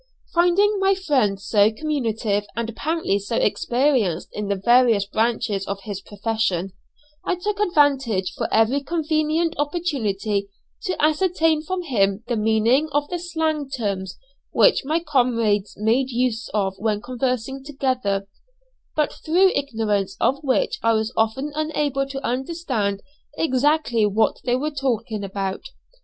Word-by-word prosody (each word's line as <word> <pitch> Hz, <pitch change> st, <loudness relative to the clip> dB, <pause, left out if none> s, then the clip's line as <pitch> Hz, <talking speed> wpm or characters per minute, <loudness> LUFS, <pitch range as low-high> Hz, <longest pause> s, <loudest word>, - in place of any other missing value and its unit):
Finding 390 Hz, +4 st, +3 dB
my 390 Hz, 0 st, +3 dB
friend 265 Hz, -, +1 dB
so 205 Hz, +1 st, +3 dB
communicative 225 Hz, -7 st, -1 dB
and 230 Hz, 0 st, -2 dB
apparently 305 Hz, -6 st, -1 dB
so 205 Hz, +3 st, -4 dB
experienced 230 Hz, -, +1 dB
in 210 Hz, -1 st, -4 dB
the 200 Hz, -, 0 dB
various 230 Hz, 0 st, +4 dB
branches 215 Hz, -2 st, -1 dB
of 195 Hz, 0 st, -4 dB
his 200 Hz, -2 st, -5 dB
profession, 205 Hz, -3 st, -2 dB, 0.5 s
I 370 Hz, -, 0 dB
took 410 Hz, +3 st, -3 dB
advantage 275 Hz, -, +2 dB
of -, -, 0 dB
every 225 Hz, +6 st, +3 dB
convenient 315 Hz, +1 st, 0 dB
opportunity 225 Hz, -, -1 dB, 0.4 s
to 370 Hz, -, -2 dB
ascertain 320 Hz, 0 st, +2 dB
from 360 Hz, +3 st, -3 dB
him 200 Hz, -, +1 dB
the 240 Hz, -, 0 dB
meaning 225 Hz, +7 st, +2 dB
of 290 Hz, 0 st, 0 dB
the 355 Hz, -, -3 dB
slang 320 Hz, -4 st, -2 dB
terms 200 Hz, -8 st, -3 dB, 0.3 s
which -, -, +4 dB
my 315 Hz, +5 st, 0 dB
comrades 230 Hz, -, +1 dB
made 230 Hz, +6 st, +1 dB
use 240 Hz, -2 st, -1 dB
of 195 Hz, -3 st, 0 dB
when 215 Hz, -1 st, 0 dB
conversing 255 Hz, +2 st, -3 dB
together, 255 Hz, -9 st, -1 dB, 0.7 s
but 300 Hz, -1 st, +1 dB
through 365 Hz, +4 st, +3 dB
ignorance 215 Hz, -8 st, -1 dB
of 275 Hz, +3 st, +1 dB
which 265 Hz, -2 st, +1 dB
I 230 Hz, 0 st, +3 dB
was 220 Hz, +1 st, -1 dB
often 225 Hz, +7 st, 0 dB
unable 295 Hz, -3 st, -1 dB
to 275 Hz, 0 st, -6 dB
understand 250 Hz, -, -2 dB, 0.3 s
exactly 260 Hz, -5 st, +2 dB
what 215 Hz, +2 st, +1 dB
they 245 Hz, -1 st, +2 dB
were 295 Hz, +4 st, -1 dB
talking 235 Hz, -6 st, -2 dB
about. 195 Hz, -1 st, -3 dB
250 Hz, 135 wpm, -22 LUFS, 210-300 Hz, 0.7 s, various